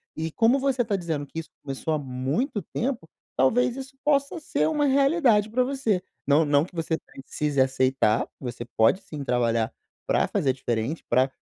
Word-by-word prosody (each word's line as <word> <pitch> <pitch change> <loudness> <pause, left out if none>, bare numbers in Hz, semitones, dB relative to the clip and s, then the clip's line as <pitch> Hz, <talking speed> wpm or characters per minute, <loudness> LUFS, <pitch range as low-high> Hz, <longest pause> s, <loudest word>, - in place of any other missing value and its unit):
E, 160 0 -3
como 235 - +3
você 265 -3 +1
tá 205 -2 0
dizendo 160 -5 -3
que 160 +3 -6
isso 160 - -8
começou 135 +3 -4
há - - +1
muito 140 - -2
tempo, 230 - -3 0.3
talvez 235 - +3
isso 270 0 -8
possa 280 +3 +1
ser 310 - 0
uma 300 -2 +1
realidade 275 -6 +3
pra 250 +3 +2
você. 250 -8 0 0.2
Não 150 +2 +4
não 145 +2 +3
que 180 - -17
você 165 -1 -1
precise 140 +1 -4
aceitar, 130 -4 +2
você 125 -2 -5
pode 115 - +4
sim 150 -3 -7
trabalhar 115 -3 +1 0.3
pra - - +2
fazer 130 -2 +1
diferente, 120 +4 -2
pra 130 +2 +3
160 Hz, 175 wpm, -25 LUFS, -, 0.3 s, Não